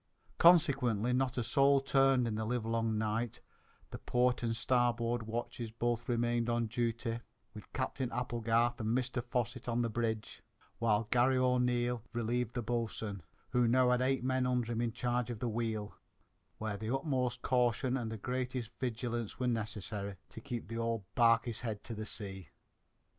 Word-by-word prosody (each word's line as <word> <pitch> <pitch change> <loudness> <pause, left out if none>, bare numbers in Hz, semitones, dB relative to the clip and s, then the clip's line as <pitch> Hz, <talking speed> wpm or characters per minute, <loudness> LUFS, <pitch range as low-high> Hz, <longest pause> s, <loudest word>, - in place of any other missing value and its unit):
Consequently, 135 - +5
not 130 0 0
a 120 - +1
soul 140 +3 +4
turned 135 -2 +3
in 110 - -1
the 110 +1 -2
livelong 115 -1 0
night, 110 +1 -1 0.5
the - - -6
port 125 0 +1
and 115 -1 0
starboard 120 0 +1
watches 115 0 -4
both 115 +1 -2
remaining 120 0 +1
on 120 0 +1
duty, 115 0 -1 0.3
with 105 - -11
Captain 130 -1 -2
Applegarth 120 -1 +1
and 110 +2 +1
Mr 125 -1 -2
Fosset 125 0 -2
on 120 0 +1
the 115 - -1
bridge, 110 -1 -2 0.4
while 110 -1 +2
Garry 125 +2 +4
O'Neil 125 -1 +2
relieved 120 +1 -1
the 120 - -1
boatswain, 110 -3 -2 0.3
who 125 -1 +3
now 125 +1 +4
had 125 0 +2
eight 130 0 +1
men 130 0 +1
under 125 -2 0
him 115 0 -1
in 120 -1 0
charge 120 0 -1
of 120 - -3
the 120 - -2
wheel, 110 -2 -2 0.6
where 110 -2 -3
the 110 +2 -4
utmost 130 -2 -1
caution 125 +1 +2
and 115 -4 -2
the 110 - -4
greatest 125 +1 -3
vigilance 120 -2 -3
were 125 - 0
necessary 105 -3 -3
to 115 - -10
keep 120 -2 -5
the 115 +1 -4
old 115 -2 -1
barquey's 115 -1 +3
head 110 -4 -4
to 115 - -6
the 110 0 -5
sea. 95 -4 -7
120 Hz, 165 wpm, -33 LUFS, 115-125 Hz, 0.6 s, Consequently